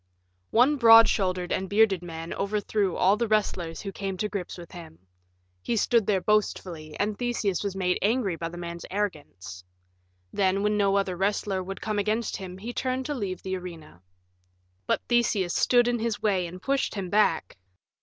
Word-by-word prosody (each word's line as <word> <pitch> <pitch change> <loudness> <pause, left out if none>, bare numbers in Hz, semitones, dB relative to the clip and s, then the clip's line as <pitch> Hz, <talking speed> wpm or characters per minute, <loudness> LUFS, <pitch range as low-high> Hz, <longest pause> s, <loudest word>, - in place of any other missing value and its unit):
One 255 +6 +4
broad 225 -2 +8
shouldered 185 -3 -1
and 190 0 -1
bearded 205 -3 +3
man 165 -1 -6
overthrew 200 -2 -1
all 195 +3 +4
the 235 +1 0
wrestlers 185 -6 -1
who 200 - -5
came 195 -1 -4
to 210 - -1
grips 195 -4 -5
with 170 -1 -11
him. 170 - -11 0.6
He 235 - -1
stood 230 0 +2
there 195 -3 +2
boastfully, 175 -7 -1
and 210 +1 0
Theseus 230 -7 -1
was 200 -2 -3
made 180 -1 0
angry 210 -3 +1
by 165 0 -4
the 175 - -9
man's 170 0 -6
arrogance. 145 - -5 0.7
Then, 195 0 +1
when 210 0 +2
no 200 -1 +2
other 195 -2 0
wrestler 195 0 -1
would 195 +1 -7
come 215 -1 -1
against 215 +2 -1
him, 185 -1 -8
he 230 +5 -6
turned 260 +1 -2
to 295 - -2
leave 200 -8 -4
the 190 0 -2
arena. 165 - -9 0.9
But - - 0
Theseus 220 -7 +1
stood 245 -1 +3
in 240 -1 0
his 225 -1 -2
way 190 -4 +1
and 180 +2 -9
pushed 275 -3 0
him 190 -3 -4
back. 210 -6 +2
195 Hz, 180 wpm, -26 LUFS, 180-215 Hz, 0.9 s, broad